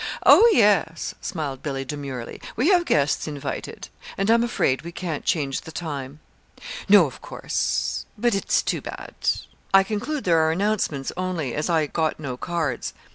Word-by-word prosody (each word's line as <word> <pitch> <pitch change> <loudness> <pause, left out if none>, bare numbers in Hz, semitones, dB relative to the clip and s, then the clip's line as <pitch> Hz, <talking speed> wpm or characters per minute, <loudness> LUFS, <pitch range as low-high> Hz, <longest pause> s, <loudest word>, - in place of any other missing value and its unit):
"Oh, 470 - +8
yes," 200 - +2
smiled 140 -5 -4
Billy, 135 -2 -3
demurely. 135 -4 -6
"We 260 +10 +2
have 355 -3 +4
guests 145 - +1
invited 145 -2 -6 0.3
and 195 +3 +2
I'm 230 0 +4
afraid 135 - +1
we 170 - -8
can't 170 -3 -4
change 140 -5 0
the 160 - -10
time." 145 -3 -6 0.7
"No, - - +8
of - - -8
course - - -2
not; - - -16
but 240 -2 +4
it's 195 - +1
too - - -1
bad. - - -8 0.6
I 195 - +8
conclude 245 +9 -3
there 165 -3 +3
are 160 0 +3
announcements 175 -7 -1
only, 175 -8 -2
as 150 +3 -2
I 160 -2 +3
got 155 +1 -1
no 135 -5 -4
cards. 155 -3 -3
160 Hz, 165 wpm, -24 LUFS, 140-195 Hz, 0.7 s, Oh